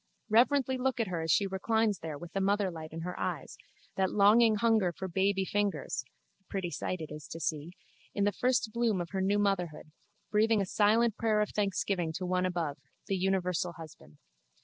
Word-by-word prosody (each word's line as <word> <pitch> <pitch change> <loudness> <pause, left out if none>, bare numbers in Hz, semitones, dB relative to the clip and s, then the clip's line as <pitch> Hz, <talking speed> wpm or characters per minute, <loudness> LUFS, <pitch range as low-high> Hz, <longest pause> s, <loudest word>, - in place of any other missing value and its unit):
Reverently 260 +3 +3
look 260 0 0
at 225 -4 0
her 170 -2 -2
as 160 - -4
she 200 - +3
reclines 210 +2 0
there 155 -2 -5
with 175 +2 -10
the 195 - 0
motherlight 190 -5 -1
in 165 +1 -6
her 180 +2 -4
eyes, - - -3 0.4
that 190 -1 +2
longing 215 +2 +5
hunger 220 -4 +2
for 190 +3 -6
baby 190 +2 +1
fingers 195 -10 -1 0.4
(a - - -38
pretty 185 -3 -4
sight 185 0 -3
it 155 - -7
is 150 -1 -8
to 165 - -7
see), 160 +1 -3 0.4
in 205 - +1
the 205 - +3
first 230 0 0
bloom 235 -5 +1
of 175 -1 -5
her 190 -1 -1
new 200 +2 +2
motherhood, 180 -7 -1 0.4
breathing 220 +1 +3
a 195 - +1
silent 220 +3 +2
prayer 220 -2 +2
of 210 - 0
thanksgiving 195 -4 -1
to 185 +3 -4
One 180 0 +1
above, 165 -6 -3 0.3
the 195 - -1
Universal 180 -2 0
Husband. 110 - -13
195 Hz, 195 wpm, -31 LUFS, 175-210 Hz, 0.4 s, longing